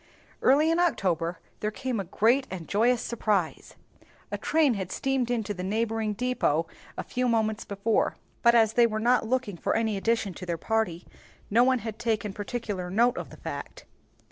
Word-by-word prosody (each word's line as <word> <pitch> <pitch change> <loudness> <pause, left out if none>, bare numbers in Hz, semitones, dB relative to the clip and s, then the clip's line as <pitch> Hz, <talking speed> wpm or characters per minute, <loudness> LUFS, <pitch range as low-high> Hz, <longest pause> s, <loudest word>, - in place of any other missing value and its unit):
Early 295 +5 +4
in 330 - +2
October 180 - +1 0.2
there 210 - -1
came 250 +1 -3
a - - -1
great 235 +9 +2
and 175 -4 -6
joyful 235 +5 +3
surprise. 215 -7 -2 0.6
A - - -2
train 310 -5 +3
had 190 -4 -4
steamed 270 -3 0
into 225 -4 -1
the 180 -2 -6
neighboring 220 +1 -1
depôt 215 -10 +1 0.3
a - - -3
few 250 0 -1
moments 220 -2 0
before, 205 +2 0 0.3
but 235 -1 +5
as 225 -2 +4
they 240 -1 +5
were 215 -1 -2
not 240 0 +2
looking 245 -6 -1
for - - -1
any 220 -2 0
addition 225 -1 0
to 180 - -8
their 170 -1 -1
party, 185 -3 -1 0.5
no 235 +4 +5
one 260 0 +3
had 220 -1 -5
taken 215 -4 -1
particular 205 -4 -4
note 235 +6 +3
of - - -6
the - - -13
fact. - - -7
220 Hz, 180 wpm, -27 LUFS, 200-245 Hz, 0.6 s, but